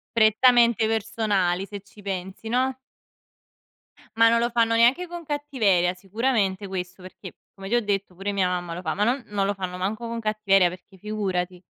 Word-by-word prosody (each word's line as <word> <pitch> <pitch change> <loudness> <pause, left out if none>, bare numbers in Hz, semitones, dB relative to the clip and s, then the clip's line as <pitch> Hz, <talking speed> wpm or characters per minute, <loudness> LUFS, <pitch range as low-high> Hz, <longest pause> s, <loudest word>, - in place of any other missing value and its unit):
Prettamente 235 0 +4
personali 210 -4 0
se 200 0 -8
ci 200 +1 -18
pensi, 190 +1 -6
no? 255 +2 0 1.4
Ma 230 0 +6
non 230 0 +3
lo 235 +1 +1
fanno 230 -1 +2
neanche 255 +10 +3
con 345 0 -7
cattiveria, 255 - +1
sicuramente 200 0 -1
questo 185 0 -6
perché, 185 0 -11 0.2
come 195 -1 -9
ti 230 - 0
ho 240 - +3
detto, 200 -3 -2
pure 195 +3 -4
mia 195 -2 +1
mamma 175 -1 -3
lo 170 - -5
fa, 160 -3 -2
ma 205 - -2
non 245 +4 +1
non 205 -1 -1
lo 200 +1 0
fanno 185 -2 -5
manco 210 +6 -3
con 230 0 -4
cattiveria 210 -4 +3
perché 185 +2 -12
figurati. 185 -3 -3
205 Hz, 180 wpm, -24 LUFS, 185-230 Hz, 1.4 s, Ma